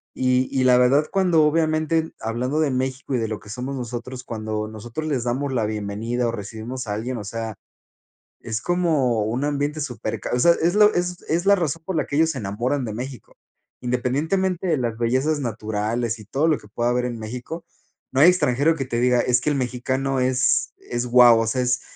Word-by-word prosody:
y 130 0 +2
y 130 - +1
la 125 -1 +6
verdad, 135 +5 +4
cuando 175 -5 +3
obviamente 160 +1 +1
hablando 125 +7 -2
de 150 -4 +2
México 130 +1 -2
y 125 - +1
de 115 - -1
lo 110 - -4
que 105 - -15
somos 125 +5 -4
nosotros 125 0 -6
cuando 110 -1 -3
nosotros 120 +8 -6
les 130 -6 -1
damos 130 +3 -1
la 115 -4 +1
bienvenida 110 +3 -2
o 115 - 0
recibimos 115 +3 -6
a 105 - -2
alguien, 120 +3 -3
o 105 - -5
sea, 115 0 -5 0.9
es 110 0 -3
como 155 -11 +1
un 120 +6 -2
ambiente 145 +1 -1
súper 130 -5 -4
ca - - -5
o 125 - +1
sea, 170 +7 +6
es 175 +3 +2
lo 210 0 +6
es 175 0 -2
es 170 +4 +1
la 200 - +7
razón 165 -3 -2
por 190 - -3
la 150 - +1
que - - -4
ellos 160 0 +4
se 135 - -6
enamoran 120 +6 -2
de 110 - -4
México, 125 -1 -7 0.5
independientemente 160 +10 0
de 160 - +2
las 115 -3 -2
bellezas 130 +6 +1
naturales 110 0 -2
y 105 - -12
todo 140 +9 0
lo 155 - +3
que 105 - -17
pueda 120 +2 0
haber 125 0 0
en 120 -2 -4
México, 125 +10 -6 0.5
no 135 +2 +2
hay 170 - +9
extranjero 155 -2 +2
que 135 -4 -3
te 120 -2 -2
diga: 125 0 +3
"Es 125 -1 +2
que 150 - 0
el 145 - 0
mexicano 130 +2 -1
es 130 0 +2
es 120 +1 -4
wao, 120 -1 +7
o 115 - -1
sea, 125 +3 0
es 125 0 +1
125 Hz, 215 wpm, -23 LUFS, 115-150 Hz, 0.9 s, hay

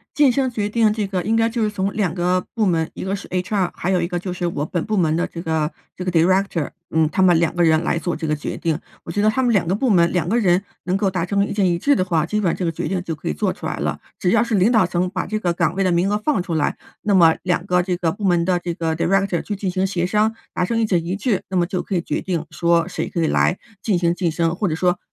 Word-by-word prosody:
晋 280 -3 +5
升 265 0 0
决 210 -4 -2
定 220 0 +2
这 210 -1 -2
个 190 -2 -2
应 220 +5 +1
该 225 0 +3
就 230 0 -2
是 215 - +1
从 195 -1 -2
2 200 -6 0
个 180 +1 0
部 220 -3 +1
门， 165 -3 +1
一 - - -6
个 190 +1 -1
是 195 - -7
HR， 185 +1 -1
还 180 - -2
有 185 -2 +2
一 170 - -1
个 175 -1 -2
就 180 +1 -5
是 175 0 -2
我 150 -3 -3
本 170 -1 -2
部 215 - -1
门 160 -5 +2
的 170 +2 +1
这 170 - -7
个 160 -2 -1 0.2
这 180 - -6
个 180 - 0
director， 180 -1 +2 0.2
嗯， 160 -1 +2
他 190 - +1
们 175 -3 +5
2 170 -1 +1
个 175 - +1
人 160 -1 +3
来 - - 0
做 175 - -2
这 160 0 -4
个 150 - +1
决 150 - -5
定， 165 -3 -1 0.3
我 165 - -6
觉 205 - 0
得 215 - +4
他 260 +4 0
们 240 - +3
2 195 -6 +2
个 190 - +1
部 260 +5 0
门 170 -5 +4
2 175 -2 0
个 220 - +1
人 190 -4 +2 0.2
能 185 +1 0
够 195 0 +1
达 180 -3 -1
成 200 +2 +1
意 - - -4
见 205 -1 +1
一 175 -2 +2
致 285 +10 +3
的 185 - +1
话， 165 -4 0
基 210 +5 -1
本 185 -5 +1
上 - - -2
这 185 - -3
个 165 - 0
决 155 - -3
定 185 +1 -1
就 165 - -3
可 155 - -6
以 - - 0
做 75 - -1
出 - - -12
来 - - -2
了， - - -2 0.2
只 180 - +1
要 220 +2 +4
是 235 -2 0
领 195 +5 +3
导 220 -5 +5
层 180 +1 0
把 185 -1 -2
这 215 - -2
个 180 -5 0
岗 170 0 0
位 195 - +1
的 185 - +2
名 175 +3 +2
额 210 - +1
放 215 -3 0
出 175 -2 -4
来， 155 - 0 0.3
那 210 -2 +1
么 165 -3 +6
2 180 -1 0
个 180 -2 +2
这 180 0 -1
个 170 -2 +1
部 200 +5 -6
门 175 -3 +3
的 180 0 +2
这 175 -1 -4
个 160 -1 -2
director 195 +1 +1
去 210 - -4
进 195 -1 -2
行 185 +1 0
协 185 -3 -1
商， 215 +4 +1 0.2
达 180 - 0
成 230 +6 -1
意 - - +2
见 180 -6 +1
一 175 +2 -2
致， 205 0 0
那 190 - -3
么 175 - +3
就 180 +1 -3
可 - - -4
以 175 - +2
决 - - -2
定 175 -4 -2
说 170 -1 +1
谁 - - -3
可 170 - -2
以 160 - +2
来 180 - +2 0.2
进 210 -5 +1
行 170 -1 +2
晋 175 0 -1
升， 165 +1 0
或 205 - 0
者 160 - -1
说 180 +2 +1
180 Hz, 365 characters per minute, -21 LUFS, 170-200 Hz, 0.3 s, 么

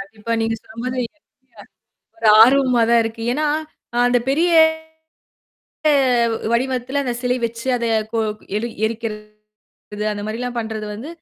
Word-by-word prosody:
கண்டிப்பா. 215 +3 -6
நீங்க 225 0 0
சொல்ற - - -17
மாதிரி 255 0 -2
இது 310 +7 -12 0.4
எனக்கு - - -16 0.5
ஒரு 225 - +1
ஆர்வமா 255 0 +5
தான் 235 -1 +5
இருக்கு. 225 0 -5
ஏன்னா, 305 +2 -1 0.5
அ - - -1
அந்தப் 245 0 +1
பெரிய 325 +6 +2 1.8
வ் - - -1 0.2
வடிவத்துல 260 +2 0
அந்தச் 245 -3 -3
சிலை 250 0 +1
வச்சு 230 +2 -4
அதை 235 - -2 0.3
கொ 230 - -1 0.4
எடி 230 +3 -2 0.2
எரிக்கிறது 210 -1 -8
அந்த 205 0 -5
மாரில்லாம் 245 +3 -4
பண்றது 220 -1 -4
வந்து 245 +9 -8
235 Hz, 145 wpm, -20 LUFS, 220-250 Hz, 1.8 s, ஆர்வமா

